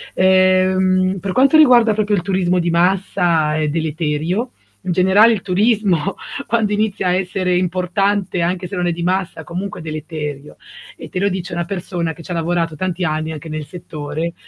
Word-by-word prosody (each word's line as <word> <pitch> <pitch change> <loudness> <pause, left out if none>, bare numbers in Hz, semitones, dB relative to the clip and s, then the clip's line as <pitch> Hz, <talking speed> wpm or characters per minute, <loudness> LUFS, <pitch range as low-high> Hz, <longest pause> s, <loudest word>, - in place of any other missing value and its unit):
Ehm, 185 0 +3
per 195 - -3
quanto 275 - +5
riguarda 245 -7 +6
proprio 210 -1 +1
il 180 - 0
turismo 185 -2 0
di 170 0 0
massa 170 -3 +1
è 155 -1 0
deleterio, 160 - -2 0.3
in 180 - 0
generale 190 +6 +5
il 205 - -3
turismo 200 -4 +1 0.3
quando 220 -3 +1
inizia 205 -3 0
a 180 - +2
essere 185 -1 -1
importante 185 +1 0
anche 180 +1 -1
se 200 - -7
non 175 0 0
è 175 - 0
di 170 +1 -5
massa, 185 -2 -1
comunque 180 +4 -5
è - - -10
deleterio 155 -2 -6 0.4
e - - -10
te 180 - -3
lo 200 - +2
dice 185 -2 -5
una 170 0 -1
persona 175 -3 -3
che 165 - -13
ci - - -9
ha - - -1
lavorato 165 -1 -1
tanti 185 0 -2
anni 155 -1 -1
anche 155 +1 -8
nel 155 -1 -5
settore, 160 0 -5
180 Hz, 180 wpm, -18 LUFS, 165-195 Hz, 0.4 s, riguarda